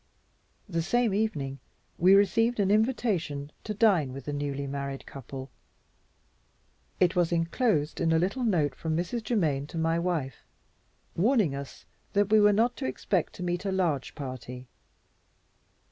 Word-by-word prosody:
The 170 Hz, -4 st, -1 dB
same 230 Hz, +5 st, +1 dB
evening 150 Hz, -11 st, -1 dB, 0.4 s
we 185 Hz, +3 st, +7 dB
received 225 Hz, +4 st, +3 dB
an 200 Hz, -1 st, +2 dB
invitation 205 Hz, -, 0 dB
to 215 Hz, -, -4 dB
dine 195 Hz, -, +3 dB
with 135 Hz, 0 st, -8 dB
the 145 Hz, -, -3 dB
newly 140 Hz, -1 st, -3 dB
married 140 Hz, 0 st, -5 dB
couple. 135 Hz, 0 st, -8 dB, 1.5 s
It 180 Hz, 0 st, +3 dB
was 175 Hz, -2 st, +2 dB
inclosed 165 Hz, -, 0 dB
in 165 Hz, -1 st, +2 dB
a 165 Hz, -, +4 dB
little 195 Hz, +10 st, 0 dB
note 165 Hz, -, +2 dB
from 160 Hz, +3 st, -2 dB
Mrs. 180 Hz, +7 st, -2 dB
Germaine 155 Hz, -, 0 dB
to 165 Hz, -, -8 dB
my 165 Hz, +1 st, +1 dB
wife, 165 Hz, -7 st, -3 dB, 0.7 s
warning 210 Hz, -, +3 dB
us 140 Hz, 0 st, -8 dB, 0.3 s
that 205 Hz, 0 st, +2 dB
we 215 Hz, -, +7 dB
were 210 Hz, 0 st, +6 dB
not 230 Hz, +4 st, +2 dB
to -, -, -3 dB
expect 170 Hz, +7 st, -1 dB
to 180 Hz, -, -7 dB
meet 175 Hz, 0 st, -2 dB
a 195 Hz, -, -1 dB
large 170 Hz, -8 st, -1 dB
party. 130 Hz, -3 st, -7 dB
170 Hz, 150 wpm, -28 LUFS, 140-205 Hz, 1.5 s, we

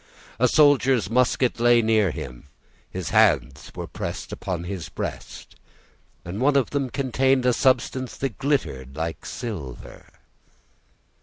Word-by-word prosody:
A 125 Hz, -, +5 dB
soldier's 135 Hz, -6 st, +4 dB
musket 125 Hz, 0 st, +2 dB
lay 120 Hz, 0 st, +5 dB
near 110 Hz, -3 st, +3 dB
him; 65 Hz, -3 st, -8 dB, 0.4 s
his 90 Hz, -3 st, -5 dB
hands 100 Hz, -, +2 dB
were -, -, -5 dB
pressed -, -, -6 dB
upon 90 Hz, -2 st, -4 dB
his 90 Hz, -2 st, -6 dB
breast, -, -, -7 dB, 0.7 s
and 95 Hz, +6 st, -5 dB
one 140 Hz, +2 st, +3 dB
of 135 Hz, -3 st, +2 dB
them 140 Hz, -2 st, -1 dB
contained 130 Hz, 0 st, +1 dB
a 125 Hz, -, +4 dB
substance 130 Hz, 0 st, +1 dB
that 135 Hz, -6 st, -4 dB
glittered 80 Hz, -, -1 dB
like 80 Hz, -1 st, -4 dB
silver. 85 Hz, -, -7 dB
115 Hz, 130 wpm, -24 LUFS, 85-130 Hz, 0.7 s, A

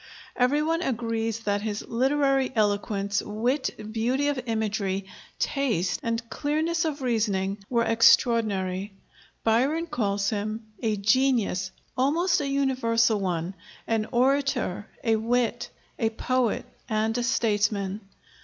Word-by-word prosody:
Every 270 Hz, +4 st, +2 dB
one 330 Hz, +2 st, 0 dB
agrees 230 Hz, -, -2 dB
that 205 Hz, -2 st, 0 dB
his 210 Hz, -1 st, -3 dB
literary 270 Hz, +2 st, +2 dB
eloquence, 205 Hz, -1 st, 0 dB
wit, 240 Hz, +7 st, -1 dB, 0.2 s
beauty 250 Hz, +6 st, +1 dB
of 280 Hz, -3 st, -1 dB
imagery, 210 Hz, -3 st, -1 dB, 0.3 s
taste, 220 Hz, -, 0 dB
and 230 Hz, -2 st, -2 dB
clearness 315 Hz, +6 st, 0 dB
of 295 Hz, -3 st, -3 dB
reasoning, 205 Hz, -5 st, 0 dB
were 235 Hz, -2 st, +2 dB
extraordinary. 210 Hz, -4 st, +3 dB, 0.5 s
Byron 265 Hz, +9 st, +2 dB
calls 205 Hz, -10 st, -1 dB
him 215 Hz, +1 st, -3 dB, 0.2 s
"a 220 Hz, -3 st, +1 dB
genius 220 Hz, -4 st, +2 dB, 0.3 s
almost 305 Hz, +7 st, +2 dB
a 285 Hz, -, -2 dB
universal 235 Hz, -5 st, +2 dB
one; 180 Hz, -1 st, -2 dB, 0.3 s
an 220 Hz, -1 st, 0 dB
orator, 255 Hz, -6 st, +1 dB, 0.2 s
a 225 Hz, -2 st, +3 dB
wit, 235 Hz, +1 st, 0 dB, 0.3 s
a 225 Hz, -, +2 dB
poet, 245 Hz, +1 st, 0 dB, 0.2 s
and 220 Hz, 0 st, 0 dB
a 245 Hz, -, 0 dB
statesman." 205 Hz, -4 st, 0 dB
230 Hz, 115 wpm, -26 LUFS, 205-265 Hz, 0.5 s, extraordinary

